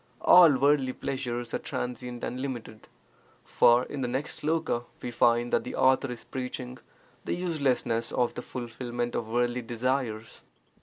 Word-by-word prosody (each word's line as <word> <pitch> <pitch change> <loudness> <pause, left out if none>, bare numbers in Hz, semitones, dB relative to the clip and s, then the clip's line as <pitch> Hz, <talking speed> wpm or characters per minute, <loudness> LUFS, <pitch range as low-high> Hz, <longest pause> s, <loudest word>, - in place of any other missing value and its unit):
All 170 -6 +7
worldly 135 -1 +3
pleasures 120 -3 -4
are - - 0
transient 125 -1 -5
and 125 - -3
limited. 120 -5 -6 0.6
For 120 +1 +4
in 140 0 -6
the 125 - 0
next 130 +4 -4
sloka 155 -6 0
we 125 - -5
find 120 +1 +2
that - - +3
the - - -6
author 130 0 +3
is 120 - -8
preaching 125 -1 -6 0.4
the - - -2
uselessness 140 -9 0
of 125 -1 0
the - - -5
fulfilment 120 0 -5
of 110 - -2
worldly 120 +2 0
desires. 120 -1 -2
125 Hz, 150 wpm, -28 LUFS, 120-135 Hz, 0.6 s, All